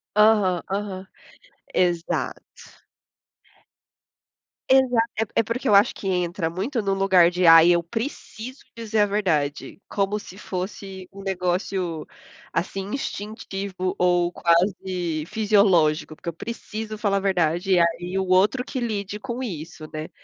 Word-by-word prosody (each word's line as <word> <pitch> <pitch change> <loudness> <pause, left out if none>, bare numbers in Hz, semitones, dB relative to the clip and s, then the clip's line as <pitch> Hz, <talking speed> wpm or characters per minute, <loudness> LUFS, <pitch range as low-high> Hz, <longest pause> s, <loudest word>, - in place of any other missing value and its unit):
Aham, 210 -5 +4
aham. 195 -1 -3 0.7
Exato. 175 -2 -2 1.9
Exato, 250 -3 +3
é 220 - +1
po - - -29
é 230 - +5
porque 230 +3 -2
eu 210 - +4
acho 200 +1 +5
que 195 - -4
entra 175 -2 -1
muito 220 - -2
no 195 -1 0
lugar 190 -3 +4
de: 180 0 0
"Ai, 165 +1 +9
eu 175 -1 +4
preciso 230 - -6
dizer 225 -2 -2
a 210 - +6
verdade", 185 -5 -1
como 205 +1 -1
se 190 -1 -12
fosse 190 -1 -6
um 195 - -10
negócio, 180 -3 -2 0.5
assim, 195 +3 -2
instintivo 200 -6 -4
ou 175 -1 +3
quase 175 -2 0
fisiológico, 190 -8 +2
"Porque - - -14
eu 170 - -1
preciso 220 +2 -6
falar 205 -2 +1
a - - +1
verdade". 180 -1 +1
E, 175 - +4
aí, 175 +2 0
o 190 - -2
outro 190 +7 +3
que 255 - -4
lide 210 -3 -3
com 250 -1 -4
isso, 165 - -6
né. 155 +1 -5
190 Hz, 140 wpm, -24 LUFS, 175-210 Hz, 1.9 s, Ai